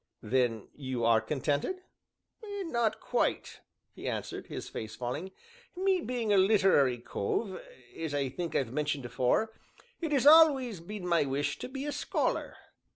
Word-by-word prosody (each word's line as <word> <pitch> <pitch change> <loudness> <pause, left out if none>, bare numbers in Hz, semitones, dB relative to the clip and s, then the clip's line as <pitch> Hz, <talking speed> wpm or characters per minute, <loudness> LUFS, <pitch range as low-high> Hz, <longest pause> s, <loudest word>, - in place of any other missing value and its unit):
"Then 115 -2 0
you 130 -4 -3
are 115 -1 +5
contented?" 145 - -1 0.6
"Not 330 - -1
quite," - - -1 0.3
he - - -7
answered, - - -4
his - - -6
face 110 -1 -6
falling; 130 +9 -4 0.5
"me 375 0 +2
being 240 -6 -1
a - - +5
literary 190 - +4
cove 185 - -3 0.3
(as 160 -3 -3
I 140 -2 0
think 165 +4 -5
I've 125 -3 0
mentioned 150 -2 -1
afore), 130 - +1 0.5
it 325 -3 -3
has 275 -2 +2
always 285 - +6
been 190 +3 -7
my 170 -1 +3
wish 140 +1 -1
to - - -6
be 270 +1 -5
a 295 - -2
scholar." - - -1
170 Hz, 150 wpm, -30 LUFS, -, 0.6 s, always